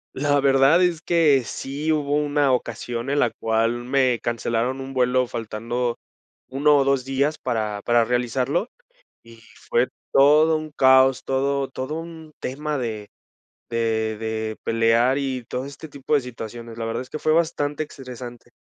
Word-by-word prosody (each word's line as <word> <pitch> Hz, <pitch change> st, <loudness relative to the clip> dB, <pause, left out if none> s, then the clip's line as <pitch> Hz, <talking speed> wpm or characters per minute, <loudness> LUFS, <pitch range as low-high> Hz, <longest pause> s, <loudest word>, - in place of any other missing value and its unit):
La 145 Hz, +1 st, +2 dB
verdad 135 Hz, +5 st, +4 dB
es 170 Hz, -3 st, +1 dB
que 155 Hz, -6 st, +3 dB
sí, 145 Hz, +4 st, -3 dB
hubo 145 Hz, -2 st, 0 dB
una 145 Hz, -2 st, +2 dB
ocasión 120 Hz, 0 st, -3 dB
en 145 Hz, -, +1 dB
la 120 Hz, -, +3 dB
cual 115 Hz, +2 st, -1 dB
me 130 Hz, -1 st, +1 dB
cancelaron 120 Hz, +2 st, -1 dB
un 135 Hz, 0 st, -7 dB
vuelo 125 Hz, 0 st, +2 dB
faltando 115 Hz, +2 st, -3 dB, 0.5 s
1 145 Hz, +3 st, +3 dB
o 140 Hz, -, +4 dB
2 135 Hz, -2 st, +1 dB
días 140 Hz, +3 st, 0 dB
para 110 Hz, -5 st, -3 dB
para 120 Hz, -1 st, +3 dB
realizarlo, 125 Hz, -, -1 dB, 0.5 s
y 115 Hz, 0 st, -16 dB, 0.3 s
fue 120 Hz, +2 st, +3 dB, 0.2 s
todo 155 Hz, +3 st, +5 dB
un 155 Hz, -1 st, -8 dB
caos, 130 Hz, -1 st, +4 dB
todo 135 Hz, +1 st, 0 dB
todo 130 Hz, +3 st, -5 dB
un 160 Hz, -1 st, -8 dB
tema 150 Hz, +3 st, -3 dB
de 110 Hz, -5 st, -4 dB, 0.6 s
de 110 Hz, -2 st, -1 dB
de 110 Hz, 0 st, -3 dB
pelear 115 Hz, +3 st, +2 dB
y 130 Hz, -3 st, -2 dB
todo 125 Hz, +3 st, -5 dB
este 140 Hz, +3 st, -10 dB
tipo 140 Hz, +1 st, -4 dB
de 145 Hz, -, +4 dB
situaciones. 115 Hz, -1 st, -8 dB
La 115 Hz, -, -3 dB
verdad 115 Hz, +1 st, -3 dB
es 125 Hz, -, -10 dB
que 155 Hz, -, -6 dB
fue 155 Hz, -, +2 dB
bastante 155 Hz, -2 st, 0 dB
estresante. 125 Hz, -4 st, -10 dB
130 Hz, 160 wpm, -23 LUFS, 120-145 Hz, 0.6 s, todo